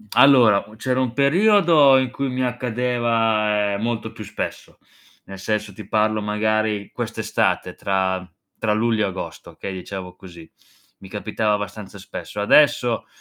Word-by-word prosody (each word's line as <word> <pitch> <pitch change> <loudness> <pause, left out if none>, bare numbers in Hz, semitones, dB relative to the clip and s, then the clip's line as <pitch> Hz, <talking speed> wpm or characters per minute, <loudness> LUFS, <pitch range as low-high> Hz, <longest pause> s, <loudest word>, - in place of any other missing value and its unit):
Allora, 125 -6 +6
c'era 125 +3 -1
un 130 -3 -1
periodo 160 - +5
in 130 -1 0
cui 140 +2 -3
mi 130 0 -2
accadeva, 115 -4 0
ehm, 100 - -4
molto 115 0 -2
più - - -9
spesso. - - -6 0.5
Nel 95 0 -10
senso 105 +1 -2
ti - - -11
parlo 110 0 +1
magari 105 0 -1
quest'estate - - -2
tra 95 -1 -1 0.3
tra 110 -1 0
luglio 110 -1 +1
e - - -1
agosto, 95 0 -7
okay, 100 - -7
diciamo 95 0 -7
così. 85 -3 -14 0.5
Mi 95 - -13
capitava 105 +1 -1
abbastanza 105 0 -7
spesso. 100 +1 -7
Adesso, 125 -1 +3
110 Hz, 140 wpm, -21 LUFS, 100-125 Hz, 0.5 s, Allora